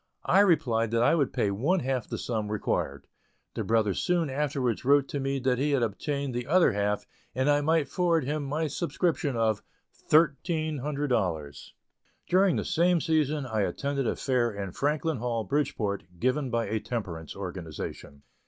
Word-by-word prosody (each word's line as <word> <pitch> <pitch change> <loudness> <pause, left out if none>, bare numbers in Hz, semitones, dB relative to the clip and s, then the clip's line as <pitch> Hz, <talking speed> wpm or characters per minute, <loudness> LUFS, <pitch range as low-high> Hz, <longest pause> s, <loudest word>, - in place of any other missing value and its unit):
I 195 - +4
replied 145 - +3
that 115 +1 +2
I - - +4
would 145 -5 +1
pay 115 -6 0
one 150 - +1
half 130 -3 -1
of - - -25
the - - -3
sum 110 -3 -3
required. 70 -9 -2 0.5
The - - -3
brother 110 -3 +2
soon 170 - 0
afterwards 135 -4 -1
wrote 140 +1 +3
me 135 -1 -1
that 130 -1 0
he 145 +1 +1
had 130 -4 +2
obtained 140 +5 -2
the 120 0 -3
other 175 +3 +5
half, 105 0 -1 0.3
and 130 +2 +1
I 145 0 +4
might 160 0 +2
forward 170 -4 +1
him 150 +2 -2
my 150 +4 -1
subscription 160 -2 -1
of 110 -2 +1 0.3
"thirteen" 155 0 +1
hundred 145 +1 -2
dollars. 80 - -2 0.5
During 185 0 +4
the - - -2
same 175 +1 +3
season 155 -3 +1
I 110 -4 -1
attended 140 +5 -1
a - - 0
fair 125 -3 +1
in 100 -2 -5
Franklin 150 - 0
Hall, 115 -1 -2
Bridgeport, 105 -5 -1
given 130 - 0
by 115 -1 0
a 110 - -1
temperance 90 -10 -5
organization. 85 -6 -7
135 Hz, 170 wpm, -28 LUFS, 110-150 Hz, 0.5 s, other